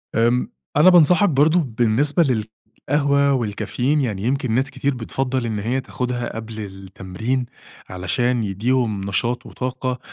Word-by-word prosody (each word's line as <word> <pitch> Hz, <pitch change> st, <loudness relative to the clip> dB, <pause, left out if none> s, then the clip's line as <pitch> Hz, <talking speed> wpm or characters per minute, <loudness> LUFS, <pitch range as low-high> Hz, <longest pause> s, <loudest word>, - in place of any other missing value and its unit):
آمم 120 Hz, +2 st, +2 dB, 0.3 s
أنا 155 Hz, +5 st, +7 dB
بانصحك 180 Hz, +2 st, +5 dB
برضه، 155 Hz, +4 st, +3 dB, 0.2 s
بالنسبة 140 Hz, +8 st, +3 dB, 0.7 s
للقهوة 140 Hz, -1 st, +3 dB
والكافيين، 125 Hz, +5 st, -1 dB
يعني 105 Hz, -7 st, -2 dB
يمكن 130 Hz, 0 st, 0 dB
ناس 130 Hz, +4 st, +1 dB
كتير 140 Hz, 0 st, -1 dB
بتفضّل 125 Hz, +1 st, -2 dB
إن 110 Hz, -2 st, -2 dB
هيّ 125 Hz, +6 st, -1 dB
تاخدها 125 Hz, -2 st, -4 dB
قبل 110 Hz, -1 st, -7 dB
التمرين، 100 Hz, +5 st, -4 dB, 0.4 s
علشان 115 Hz, +7 st, -1 dB
يديهم 110 Hz, +1 st, 0 dB
نشاط 115 Hz, +5 st, -2 dB
وطاقة، 130 Hz, 0 st, -4 dB
125 Hz, 125 wpm, -21 LUFS, 110-135 Hz, 0.7 s, أنا